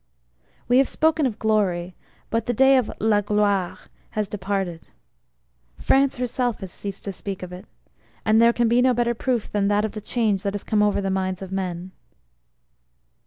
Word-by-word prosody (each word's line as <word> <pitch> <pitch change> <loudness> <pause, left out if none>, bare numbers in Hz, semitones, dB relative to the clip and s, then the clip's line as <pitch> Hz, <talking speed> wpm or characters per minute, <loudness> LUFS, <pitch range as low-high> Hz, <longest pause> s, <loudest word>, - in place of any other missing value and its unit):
We 245 +1 +5
have 270 - +3
spoken 315 -2 +2
of 225 -4 -5
`glory,' 190 -5 0 0.4
but 230 0 -1
the 245 - 0
day 265 +3 +6
of 250 -4 +1
` - - -5
la 215 -2 +3
gloire 205 -3 +1 0.2
' - - -36
has 210 -1 0
departed. 190 -4 -3 0.9
France 275 0 +3
herself 245 -2 -2
has 190 -2 -7
ceased 200 0 -7
to 200 - -4
speak 195 0 -6
of 180 0 -7
it 185 +3 -10 0.6
and 220 +1 +4
there 235 0 +6
can 235 0 +1
be 240 +2 +3
no 255 -1 +3
better 240 0 +1
proof 240 -1 -2
than 200 -1 +1
that, 205 +1 +2
of 215 - -3
the 215 - -7
change 210 -3 0
that 200 0 -2
has 205 - -5
come 215 -1 +1
over 205 -1 +2
the 195 -1 -1
minds 190 0 -2
of 190 - -9
men 185 -1 -4
210 Hz, 195 wpm, -23 LUFS, 195-235 Hz, 0.9 s, day